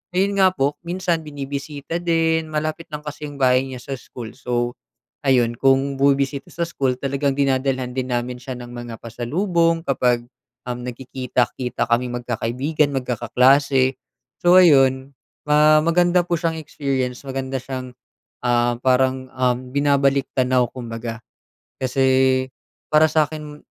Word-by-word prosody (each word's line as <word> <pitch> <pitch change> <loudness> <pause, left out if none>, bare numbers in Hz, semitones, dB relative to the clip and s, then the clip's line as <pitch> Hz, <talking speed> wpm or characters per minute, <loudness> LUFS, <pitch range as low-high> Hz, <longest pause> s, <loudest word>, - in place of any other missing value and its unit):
ayun 200 +1 +1
nga 190 -1 +6
po 140 +2 0
minsan 175 -2 -1
binibisita 145 +3 -5
din. 165 -1 +1
Malapit 155 +2 -3
lang 150 0 -6
kasi 150 0 -6
yung 145 - -9
bahay 130 0 +3
niya 130 -1 -7
sa 135 - -5
school 120 -2 -9
so, 120 -2 -2 0.5
ayun 120 -3 +3
kung 135 +1 +3
bumibisita 140 0 +1
sa 170 - -6
school, 135 -6 -1
talagang 140 +1 -1
dinadalhan 130 -2 0
din 130 0 -3
namin 120 +1 -2
siya 130 0 -6
ng 120 -1 -9
mga 120 -1 -7
pasalubong 165 - 0
kapag, 125 -4 +1 0.5
uhm, 125 0 -4
nagkikita-kita 125 0 -2
kaming 120 +1 0
magkakaibigan, 130 +6 -1
magkakaklase. 130 +2 +2 0.5
So 175 +1 +6
ayun, 135 -5 +4 0.3
ah, 150 +1 +6
maganda 175 +1 +3
po 175 -1 0
siyang 165 -1 -1
experience. 135 -3 -3
Maganda 135 0 -3
siyang, 130 0 -6 0.5
ah, 120 0 +2
parang, 130 0 +2
uhm, 125 0 0
binabalik-tanaw 135 -3 +2
kumbaga. 115 -2 -6 0.6
Kasi 130 0 +3 0.5
para 155 +1 +6
sa'kin, 150 -1 -2
135 Hz, 130 wpm, -21 LUFS, 125-150 Hz, 0.6 s, nga